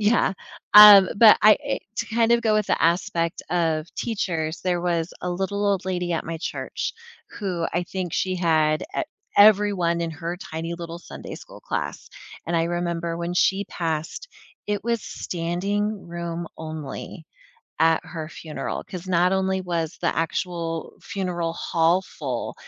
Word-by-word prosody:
yeah. 210 -1 +3 0.4
Um, 205 -2 +11
but 215 0 +8
I 215 +1 +8
eh, 280 - -1 0.2
to 230 - -2
kind 230 0 +3
of 235 0 +4
go 220 -2 +2
with 215 -1 +1
the - - +1
aspect 170 0 0
of 165 -2 0
teachers, 170 -8 -2
there 180 -1 0
was 170 -1 -1
a 180 - -2
little 195 +3 -1
old 195 -2 +1
lady 180 -2 -2
at 165 - -2
my 165 0 -5
church, - - -4 0.4
who 180 -5 -3
I 175 - 0
think 180 -1 -5
she 185 -1 0
had 155 -3 +2
e - - +1 0.3
everyone 200 -5 +5
in 165 -1 -2
her 170 +3 -5
tiny, 165 -1 -5
little 170 0 -7
Sunday - - -9
school - - -12
class, - - -4 0.4
and 170 - -2
I 165 - +2
remember 170 -1 -2
when 170 +1 -3
she 195 +2 +2
passed, 165 - -4 0.4
it 205 +1 -2
was 235 -2 0
standing-room 175 -1 -3
only 155 +1 -7 0.6
at 165 0 +4
her 160 -1 -6
funeral, 155 -2 -6
'cause 185 0 -8
not 180 +1 +3
only 190 0 +1
was 170 -2 -3
the 170 - +1
actual 165 0 -2
funeral 180 -4 -3
hall 170 +2 +2
full, 130 -9 -5
175 Hz, 155 wpm, -24 LUFS, 165-195 Hz, 0.6 s, Um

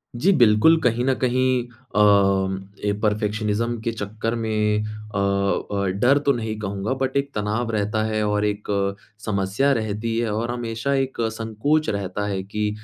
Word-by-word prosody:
जी, 175 +12 +3
बिल्कुल 120 +8 +5
कहीं 120 +1 +1
न 135 - +3
कहीं 130 -1 +1 0.3
अ, 105 - +4 0.8
ए 105 - +2
परफेक्शनिज़्म 110 +2 0
के 115 - -1
चक्कर 110 +1 -3
में 105 -2 0
अ 105 -1 -7
अ, 100 0 0 0.2
डर 135 +3 +5
तो 140 - +5
नहीं 110 -3 -3
कहूँगा। 100 +3 -2
बट 135 +1 0
एक 140 0 0
तनाव 110 +3 -1
रहता 110 0 0
है 110 0 -1
और 105 0 +1
एक 105 0 -3 0.6
समस्या 100 +6 +1
रहती 110 0 -2
है 115 -2 0
और 115 +3 -1
हमेशा 120 +2 -2
एक 135 -1 -1
संकोच 115 +7 0
रहता 100 0 -2
है 95 -2 -2
कि 105 +2 -2
110 Hz, 160 wpm, -23 LUFS, 105-120 Hz, 0.8 s, बिल्कुल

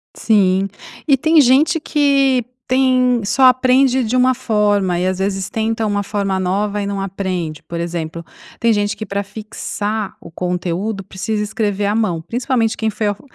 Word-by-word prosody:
Sim. 195 -3 +2 0.4
E 280 - +6
tem 320 +4 +4
gente 290 +5 +4
que 275 -4 +2 0.2
tem 255 -2 +2
só 265 +6 +1
aprende 255 0 +4
de 230 +2 -1
uma 255 0 +4
forma 205 -6 +1
e, 180 - 0
às 185 0 -2
vezes, 195 -1 -2
tenta 225 0 -1
uma 205 -1 0
forma 195 -2 -2
nova 200 +3 -1
e - - -2
não 200 -1 -3
aprende. 185 -5 -4
Por 170 - -6
exemplo, 170 -1 -4 0.4
tem 230 - +3
gente 205 -1 0
que 220 - -6
para 200 +1 -3
fixar 210 0 -5
o 170 - -12
conteúdo, 180 +4 -3
precisa 210 +3 -3
escrever 210 -2 -1
à 205 +1 0
mão, 195 -8 0
principalmente 235 - -1
quem 220 - 0
foi 215 0 -2
alf 205 0 -2
210 Hz, 170 wpm, -18 LUFS, 195-245 Hz, 0.4 s, E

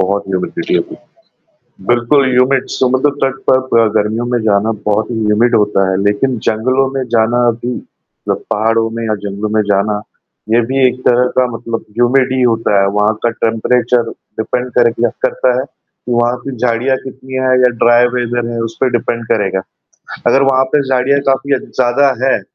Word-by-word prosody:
बहुत 100 +2 0
ह्यूमिडिटी 95 -1 -2
होगी, - - -4 0.9
बिल्कुल 120 +4 +3
ह्यूमिड 130 +1 +2
समुद्र 130 +3 +2
तट 135 0 0
पर 130 -3 +3
अ, 110 - +3
गर्मियों 110 +3 0
में 120 - +2
जाना 110 +1 +1 0.2
बहुत 110 +2 0
ही 115 -1 -3
ह्यूमिड 110 +3 +2
होता 100 -2 +1
है, 95 - 0
लेकिन 110 +4 0
जंगलों 130 +5 +1
में 130 - -1
जाना 120 +2 +3
भी 120 0 -3 0.5
जब - - -1
पहाड़ों 115 +1 +1
में 115 0 -5
या 110 - 0
जंगलों 100 +2 -4
में 110 - +3
जाना, 105 +1 0 0.5
ये 115 +2 +4
भी 135 0 +3
एक 125 0 -2
तरह 125 +1 +3
का 130 - +4
मतलब 115 0 -5
ह्यूमिड 125 +4 +2
ही 130 - 0
होता 115 -4 +2
है। 100 - +2
वहाँ 105 +1 +2
का 120 - +3
टेंपरेचर 120 +1 +1 0.3
डिपेंड 125 +3 -2
कर 120 -1 +4
किया 120 0 0
करता 130 -1 +1
है 130 - -1
कि, 125 -3 -11
वहाँ 120 +1 +1
पे 135 -2 -5
झाड़ियाँ 125 +3 0
कितनी 130 0 -10
है 130 - +3
या 125 -1 +4
ड्राई 120 +1 +5
वेदर 120 -1 -2
है 115 - -4
उसपे 115 +3 -1
डिपेंड 115 +1 -3
करेगा। 95 -4 0 0.7
अगर 135 - +4
वहाँ 130 0 +3
पे 150 - +4
झाड़ियाँ 135 +2 +2
काफ़ी 135 +1 +1 0.2
ज़्यादा 130 +2 +3
हैं, 135 - +2
120 Hz, 180 wpm, -14 LUFS, 110-130 Hz, 0.9 s, ड्राई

